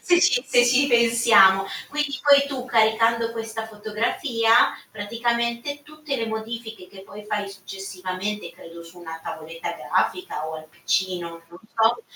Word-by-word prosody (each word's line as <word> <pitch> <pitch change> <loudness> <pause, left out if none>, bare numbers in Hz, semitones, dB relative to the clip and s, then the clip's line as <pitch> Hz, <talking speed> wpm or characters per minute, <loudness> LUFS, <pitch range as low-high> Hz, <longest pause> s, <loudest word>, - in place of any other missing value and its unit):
se 350 -1 +4
ci 255 -8 +3
se 245 -1 +4
ci 255 +3 +4
pensiamo. 230 -6 +5 0.2
Quindi 290 -2 -2
poi 280 -1 +6
tu 270 -3 -5
caricando 230 0 +2
questa 225 -1 -5
fotografia 225 - +1
praticamente 235 +5 -2
tutte 300 -1 -6
le 230 -2 -2
modifiche 220 -2 -6
che 190 0 -13
poi 205 +2 -12
fai 210 -1 -3
successivamente, 195 +1 -6
credo 170 0 -12
su 165 +2 -15
una 165 -2 -8
tavoletta 160 +1 -6
grafica 360 - -2
o 160 - -6
al 155 0 -9
PC, 185 +2 -1
non 170 -1 -8
non 175 +1 -14 0.2
so, 225 - +2
225 Hz, 150 wpm, -23 LUFS, 195-240 Hz, 0.2 s, poi